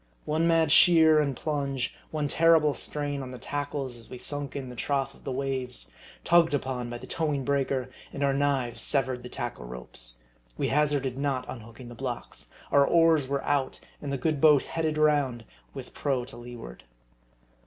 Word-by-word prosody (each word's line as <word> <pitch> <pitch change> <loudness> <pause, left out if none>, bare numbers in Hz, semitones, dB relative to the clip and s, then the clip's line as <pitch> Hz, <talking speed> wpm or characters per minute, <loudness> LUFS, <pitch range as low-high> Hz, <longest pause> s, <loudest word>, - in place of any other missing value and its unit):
One 160 +2 +1
mad 165 -2 +3
sheer 160 -2 +7
and 140 -3 0
plunge, 140 -4 -2 0.2
one 150 -2 -1
terrible 160 -1 +4
strain 145 -1 -3
on 130 - -6
the 125 - -8
tackles 140 -2 -4
as 115 - -9
we 125 - -7
sunk 145 +1 -4
in 135 -2 -5
the 125 - -9
trough 135 +1 -1
of - - -20
the 135 - -3
waves, 130 - -2 0.3
tugged 165 -3 +4
upon 130 -3 -3
by 120 - -5
the - - -10
towing 150 -5 -1
breaker, 135 -2 0 0.2
and 140 - -3
our 140 -1 +3
knives 135 -4 0
severed 130 -3 +1
the 125 - -9
tackle 120 - -5
ropes - - -5 0.4
we - - 0
hazarded 140 -3 +1
not 135 -3 -1
unhooking 115 +1 -9
the - - -9
blocks 125 0 -6 0.2
our 140 - +6
oars 165 -2 +4
were 140 0 -1
out, 140 -2 0 0.2
and 145 - -4
the 140 - -1
good 145 +2 -1
boat 150 -3 +6
headed 160 -2 -2
round, 145 -6 +2 0.3
with - - -8
prow 135 -3 -1
to 120 - -9
leeward. 120 - -10
140 Hz, 180 wpm, -28 LUFS, 125-150 Hz, 0.4 s, sheer